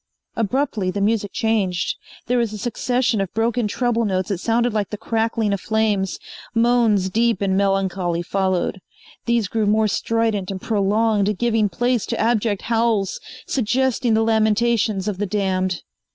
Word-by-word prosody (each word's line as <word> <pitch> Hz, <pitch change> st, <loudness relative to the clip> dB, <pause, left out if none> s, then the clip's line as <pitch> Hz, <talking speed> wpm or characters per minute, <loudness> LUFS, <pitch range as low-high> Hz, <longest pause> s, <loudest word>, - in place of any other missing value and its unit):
Abruptly 225 Hz, -3 st, 0 dB
the 200 Hz, -, -3 dB
music 205 Hz, -1 st, 0 dB
changed. 200 Hz, -6 st, 0 dB, 0.3 s
There 245 Hz, 0 st, +1 dB
was 230 Hz, -3 st, 0 dB
a -, -, -5 dB
succession 240 Hz, 0 st, 0 dB
of 195 Hz, -, -3 dB
broken 230 Hz, 0 st, +1 dB
treble 235 Hz, +2 st, 0 dB
notes 190 Hz, -1 st, -1 dB
that 195 Hz, -4 st, -2 dB
sounded 235 Hz, +3 st, +1 dB
like 210 Hz, -3 st, -1 dB
the 210 Hz, -, -5 dB
crackling 225 Hz, -1 st, 0 dB
of 200 Hz, -, -3 dB
flames. 215 Hz, -4 st, 0 dB, 0.4 s
Moans 230 Hz, -4 st, +3 dB
deep 230 Hz, -1 st, +2 dB
and 195 Hz, -1 st, 0 dB
melancholy 190 Hz, -3 st, 0 dB
followed. 190 Hz, 0 st, -1 dB, 0.5 s
These 235 Hz, -3 st, +2 dB
grew 215 Hz, +2 st, -1 dB
more 215 Hz, +1 st, +3 dB
strident 220 Hz, -2 st, 0 dB
and 195 Hz, -1 st, -4 dB
prolonged, 210 Hz, 0 st, +1 dB
giving 225 Hz, -2 st, +1 dB
place 240 Hz, +5 st, 0 dB
to -, -, -3 dB
abject 220 Hz, -3 st, +1 dB
howls, 225 Hz, -4 st, 0 dB, 0.3 s
suggesting 250 Hz, -1 st, +1 dB
the 220 Hz, -, +3 dB
lamentations 220 Hz, -2 st, +1 dB
of 200 Hz, -3 st, -3 dB
the 205 Hz, -, -1 dB
damned. 185 Hz, -3 st, -1 dB
215 Hz, 150 wpm, -21 LUFS, 195-230 Hz, 0.5 s, Moans